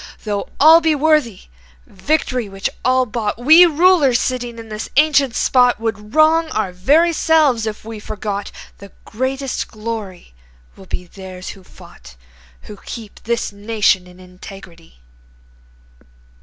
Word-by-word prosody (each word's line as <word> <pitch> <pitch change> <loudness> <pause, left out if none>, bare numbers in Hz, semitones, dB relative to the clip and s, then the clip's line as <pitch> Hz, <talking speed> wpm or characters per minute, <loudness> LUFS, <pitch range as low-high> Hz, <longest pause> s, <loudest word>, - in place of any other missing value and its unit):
Though 205 -2 -4
all 320 +3 +7
be 320 -1 +2
worthy 295 -8 +1 0.4
Victory 250 0 -2
which 195 0 -4
all 255 0 +2
bought, 215 -2 -3
We 315 +9 +7
rulers 315 -6 +3
sitting 245 -2 -3
in 225 -1 -10
this 215 0 -6
ancient 280 -5 +3
spot 250 -3 +2
Would 215 0 -5
wrong 315 +1 +4
our 215 -4 -2
very 290 - +2
selves 300 -9 +2
if 215 0 -6
we 225 -1 -8
forgot 205 -1 -5 0.3
The 200 -1 -13
greatest 260 +3 -3
glory 215 - -7 0.4
will 190 - -15
be 180 - -6
theirs 185 0 -10
who 195 - -11
fought, - - -16 0.5
Who 210 - -12
kept 220 0 -11
this 235 -1 -2
nation 205 -3 0
in 180 0 -17
integrity." 180 - -14
225 Hz, 135 wpm, -18 LUFS, 200-280 Hz, 0.5 s, all